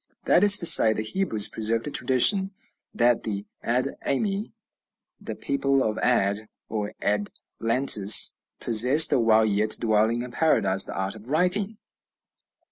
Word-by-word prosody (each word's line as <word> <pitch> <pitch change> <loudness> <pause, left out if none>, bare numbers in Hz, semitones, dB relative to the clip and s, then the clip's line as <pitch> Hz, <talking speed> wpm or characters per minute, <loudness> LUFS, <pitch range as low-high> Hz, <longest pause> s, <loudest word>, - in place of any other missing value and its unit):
That 180 - +1
is 205 0 +7
to 175 - +2
say, 110 -8 +6
the 110 - -5
Hebrews 110 - -1
preserved 115 +1 -4
a 150 - -7
tradition 190 - +1 0.4
that 120 0 0
the 100 -2 -6 0.2
Ad 125 +3 -2
ami, 200 +7 -4 0.7
the - - -9
people 140 -1 -2
of 110 -1 -4
Ad, 105 -3 -2 0.2
or 105 -2 -6
Adlantis, 105 +1 +2 0.2
possessed, 125 +8 +3
while 110 -2 +1
yet 105 +1 -1
dwelling 110 +1 -1
in 125 - -10
Paradise, 100 -10 +1
the - - -9
art 95 0 -4
of 110 +3 -14
writing. 185 +7 -1
115 Hz, 135 wpm, -23 LUFS, 110-140 Hz, 0.7 s, is